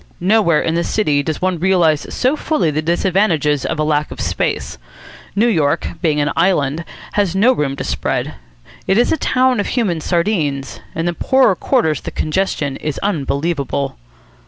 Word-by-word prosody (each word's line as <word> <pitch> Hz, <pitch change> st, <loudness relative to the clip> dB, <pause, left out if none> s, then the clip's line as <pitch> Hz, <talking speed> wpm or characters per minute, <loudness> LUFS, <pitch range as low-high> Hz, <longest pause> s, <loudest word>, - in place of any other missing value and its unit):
Nowhere 185 Hz, -4 st, +3 dB
in 165 Hz, -, 0 dB
the 170 Hz, +1 st, 0 dB
city 150 Hz, -10 st, +1 dB
does 155 Hz, +4 st, -4 dB
one 185 Hz, -2 st, 0 dB
realise 170 Hz, -4 st, +2 dB
so 255 Hz, +4 st, +1 dB
fully 305 Hz, -, 0 dB
the 155 Hz, +1 st, -1 dB
disadvantages 170 Hz, -4 st, +1 dB
of -, -, -2 dB
a 155 Hz, -, +1 dB
lack 150 Hz, 0 st, 0 dB
of -, -, -9 dB
space. -, -, -2 dB, 0.6 s
New 215 Hz, +3 st, +3 dB
York, 155 Hz, -11 st, +1 dB
being 155 Hz, -4 st, +1 dB
an 145 Hz, 0 st, +1 dB
island, 165 Hz, -3 st, +1 dB, 0.3 s
has 200 Hz, -4 st, 0 dB
had 190 Hz, -, -1 dB
no 245 Hz, +5 st, +5 dB
room 140 Hz, -, -1 dB
to -, -, -5 dB
spread. -, -, -2 dB, 0.5 s
It 190 Hz, -, +3 dB
is 240 Hz, -, +3 dB
a -, -, +2 dB
town 255 Hz, -4 st, +2 dB
of 205 Hz, -, -1 dB
human 195 Hz, -10 st, -1 dB
sardines. 160 Hz, -7 st, -1 dB, 0.2 s
In 165 Hz, -, -2 dB
the 175 Hz, -, 0 dB
poorer 260 Hz, +1 st, +3 dB
quarters 160 Hz, -2 st, +1 dB
the -, -, -5 dB
congestion 155 Hz, -4 st, -1 dB
is 150 Hz, -2 st, -4 dB
unbelievable. 140 Hz, -5 st, -1 dB
170 Hz, 175 wpm, -18 LUFS, 150-200 Hz, 0.6 s, no